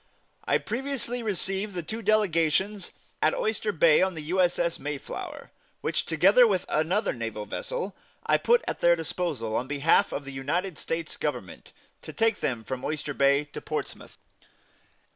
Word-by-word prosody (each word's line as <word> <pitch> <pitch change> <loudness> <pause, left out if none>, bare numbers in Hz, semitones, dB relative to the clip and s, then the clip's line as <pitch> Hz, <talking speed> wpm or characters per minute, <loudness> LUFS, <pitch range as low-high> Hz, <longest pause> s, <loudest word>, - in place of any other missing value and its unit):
I - - +3
previously 245 0 -3
received 195 -1 -1
the 175 - -3
two 220 +7 -5
delegations 195 -2 +1 0.3
at 155 - +3
Oyster 220 -1 0
Bay 160 -3 +5
on 190 -1 +1
the 155 - -6
U. 180 +5 +1
S. 175 -1 +2
S. 170 -1 0
Mayflower, 145 -1 -6 0.3
which, - - -1
together 195 +9 +6
with 190 -4 0
another 170 +8 +1
naval 115 -3 -5
vessel, 485 - -4 0.3
I - - +4
put 475 +1 +3
at - - -3
their 170 0 +5
disposal, 160 -9 -3
on 125 - -1
behalf 145 +3 +3
of 145 - -4
the 140 - -7
United 155 +6 -2
States 165 -1 -3
Government, - - -4 0.3
to - - -8
take 225 -1 +1
them 120 -4 -2
from 130 +3 -5
Oyster 150 -1 -3
Bay 140 +1 +3
to - - -6
Portsmouth. - - -5
170 Hz, 160 wpm, -27 LUFS, 145-210 Hz, 0.3 s, together